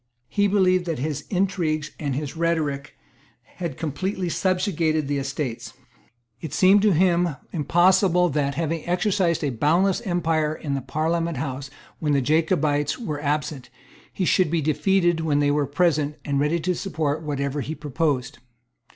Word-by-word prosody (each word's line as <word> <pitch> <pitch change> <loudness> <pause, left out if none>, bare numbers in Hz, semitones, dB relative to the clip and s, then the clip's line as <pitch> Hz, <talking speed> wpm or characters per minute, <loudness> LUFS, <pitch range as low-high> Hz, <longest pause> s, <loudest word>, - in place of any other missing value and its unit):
He 205 0 +2
believed 185 -3 +3
that 165 -3 -2
his 145 +2 -3
intrigues 175 -6 0
and 140 -4 -2
his 145 +1 -4
rhetoric 155 -4 -1 0.6
had 170 -7 -4
completely 180 +4 -2
subjugated 170 -5 0
the 145 0 -1
Estates. 135 -3 -4 0.7
It 160 - -6
seemed 195 +2 +5
to 210 -2 +4
him 175 -2 +2 0.2
impossible 180 +2 +3
that, 140 -1 -1
having 165 -1 -2
exercised 180 -2 +1
a 145 - 0
boundless 175 - +2
empire 165 -6 0
in 145 -3 -4
the 135 - -1
Parliament 160 +4 -1
House 135 +1 -4 0.3
when 150 -2 0
the 140 - +3
Jacobites 150 0 +1
were 155 -11 -4
absent, 150 -2 -2 0.4
he 185 - -2
should 185 -1 +3
be 170 +1 +1
defeated 175 +3 +2
when 155 -3 +1
they 145 0 +2
were 145 -1 +1
present, 150 -1 +1
and 140 -1 0
ready 150 +4 +1
to 180 +3 0
support 160 -6 -2
whatever 140 -2 -2
he 155 +3 -4
proposed. 145 -3 -2
155 Hz, 150 wpm, -24 LUFS, 145-175 Hz, 0.7 s, seemed